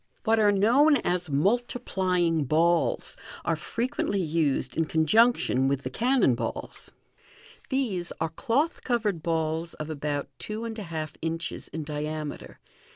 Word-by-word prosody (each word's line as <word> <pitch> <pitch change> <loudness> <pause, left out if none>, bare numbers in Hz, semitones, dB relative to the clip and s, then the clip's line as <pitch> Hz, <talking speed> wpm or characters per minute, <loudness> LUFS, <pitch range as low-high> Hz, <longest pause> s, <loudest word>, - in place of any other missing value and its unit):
What 225 -1 +3
are 210 -1 +5
known 250 +10 +5
as 180 -7 -1
"multiplying 185 - +1
balls" 165 +4 +2 0.3
are - - +2
frequently 235 -4 -2
used 155 -6 0
in 165 - +1
conjunction 160 - +3
with 140 0 0
the 130 - -4
cannon 245 - +3
balls. 120 - -4 0.8
These 220 -11 -1
are 160 - 0
cloth 270 - 0
covered 215 -8 0
balls 160 0 -1
of 155 +1 -5
about 145 -1 -2
two 215 +2 -4
and 225 -1 -5
a - - -4
half 155 -2 -4
inches 165 0 -3
in 160 - -5
diameter. 150 0 -5
170 Hz, 135 wpm, -27 LUFS, 155-225 Hz, 0.8 s, are